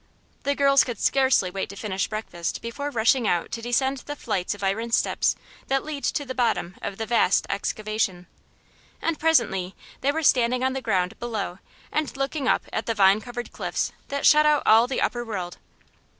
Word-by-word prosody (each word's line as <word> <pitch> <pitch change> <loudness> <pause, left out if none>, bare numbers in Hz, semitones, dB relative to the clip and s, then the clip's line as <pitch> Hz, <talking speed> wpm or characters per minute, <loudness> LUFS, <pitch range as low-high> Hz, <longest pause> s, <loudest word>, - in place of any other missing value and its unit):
The 280 0 0
girls 275 -1 +5
could 240 -3 -5
scarcely 260 -9 +3
wait 195 +1 -3
to 200 - -9
finish 195 -2 -2
breakfast 195 -6 -4
before 285 +5 -4
rushing 235 -1 +2
out 175 - 0
to 230 - -4
descend 265 +3 0
the 290 +3 -7
flights 190 -7 -2
of 200 - -10
iron 210 +5 -1
steps - - +2 0.3
that 270 0 +1
lead 300 -2 -6
to 290 - -1
the 260 - -5
bottom 235 -8 0
of 195 - -5
the 225 - -3
vast 225 -4 +3
excavation. 200 -2 -2 0.7
And 330 -2 -1
presently 225 - +2 0.2
they 275 - +1
were 320 +2 -2
standing 250 -2 +3
on 260 0 +1
the 265 - -3
ground 185 -5 -1
below 215 -6 -4 0.3
and 305 -3 -2
looking 275 0 -2
up - - +2
at 220 - -2
the 230 - 0
vine 195 0 +5
covered 240 0 -7
cliffs - - -2 0.2
that 280 0 -2
shut 300 0 +6
out 300 -1 +3
all 225 +2 +6
of - - -9
the 265 - -1
upper 240 0 0
world. 185 -6 -5
235 Hz, 195 wpm, -25 LUFS, 200-275 Hz, 0.7 s, shut